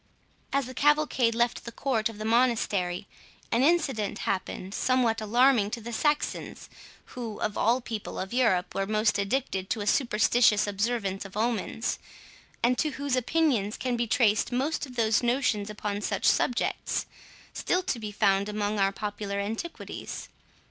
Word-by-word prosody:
As 275 -1 +1
the 255 - -8
cavalcade 295 -5 +2
left 235 +1 +1
the 235 - -7
court 230 -3 0
of 225 - -10
the 215 - -5
monastery, 220 -6 +1 0.4
an 235 - +3
incident 270 - +1
happened 190 0 -3
somewhat 240 -3 +1
alarming 235 0 +4
to 235 +2 -4
the 235 +1 -7
Saxons, 295 +5 -1 0.4
who, 230 -4 -6
of 210 - -2
all 240 +4 +2
people 225 -3 -6
of 190 +4 -4
Europe, 225 -8 +2
were 195 0 -1
most 215 0 +2
addicted 200 -3 -1
to 220 - -1
a - - -3
superstitious 225 -2 +3
observance 205 -1 -1
of 195 0 -9
omens, 225 0 -1 0.6
and 245 +1 +3
to 305 -2 0
whose 280 -2 -1
opinions 255 -5 +1
can 250 -2 -1
be 235 0 -1
traced 220 -3 +2
most 280 +4 -1
of 250 - -12
those 225 -2 +2
notions 240 -4 +1
upon 210 -1 -3
such 205 -1 -2
subjects, 245 - +1 0.5
still 365 +1 0
to 255 - -2
be 210 -2 -5
found 200 -1 +2
among 210 0 -1
our 195 0 +3
popular 205 0 -4
antiquities. 225 +12 -5
225 Hz, 155 wpm, -28 LUFS, 205-250 Hz, 0.6 s, alarming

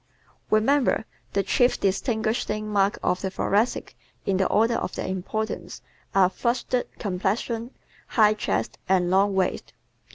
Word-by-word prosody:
_Remember, 245 +6 +3 0.3
the 200 - +2
chief 245 +4 +2
distinguishing 215 +1 -1
marks 200 -1 +2
of 180 - +1
the 190 - -1
Thoracic 205 +4 0 0.3
in 195 -2 +1
the 190 - +2
order 225 +2 +3
of - - -2
their - - -3
importance, 190 +4 -4 0.3
are 190 -2 +6
FLUSHED 240 +5 -1
COMPLEXION, 215 +4 -2 0.4
HIGH 215 -2 +4
CHEST 215 - -2
and 180 -2 +3
LONG 195 +1 +3
WAIST. 190 -1 -1
210 Hz, 130 wpm, -25 LUFS, 190-225 Hz, 0.4 s, are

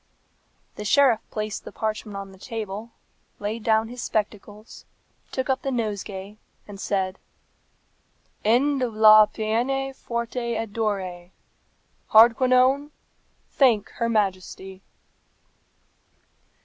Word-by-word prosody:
'" - - -42
The 210 - -5
sheriff 250 0 +4
placed 215 -1 -4
the - - -9
parchment 215 -2 -4
on 195 -1 -7
the 190 - -16
table, 215 0 -6 0.5
laid 215 +3 -4
down 220 0 +2
his 245 +1 -8
spectacles, 210 0 -4 0.5
took 260 -1 -2
up 265 -1 0
the 275 - -3
nosegay, 210 -4 -4 0.3
and 200 -1 -10
said, 190 -1 -2 1.2
"End 260 +6 +2
of 240 -4 -2
la 215 0 +8
peine 245 +6 -1
forte 235 -1 -4
et 220 -2 -4
dure. 190 -6 -3 0.8
Hardquanonne, 255 +5 +5 0.6
thank 235 -7 +3
her 230 -1 0
Majesty." 190 -2 -2
220 Hz, 110 wpm, -24 LUFS, 205-240 Hz, 1.2 s, la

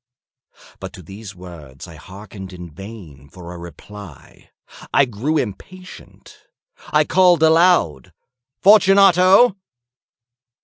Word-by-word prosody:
But - - -9
to 90 - -13
these 100 +3 -12
words 85 -6 -13
I 85 - -13
hearkened 95 +4 -12
in 90 -2 -11
vain 85 -6 -13
for 85 +2 -12
a 90 - -11
reply. 85 0 -14 0.4
I 140 - +3
grew 130 +7 -3
impatient. 180 - -9 0.5
I - - +1
called 180 -3 +2
aloud— 160 - +2 0.5
"Fortunato!" 195 +1 +4
100 Hz, 100 wpm, -18 LUFS, -, 0.5 s, Fortunato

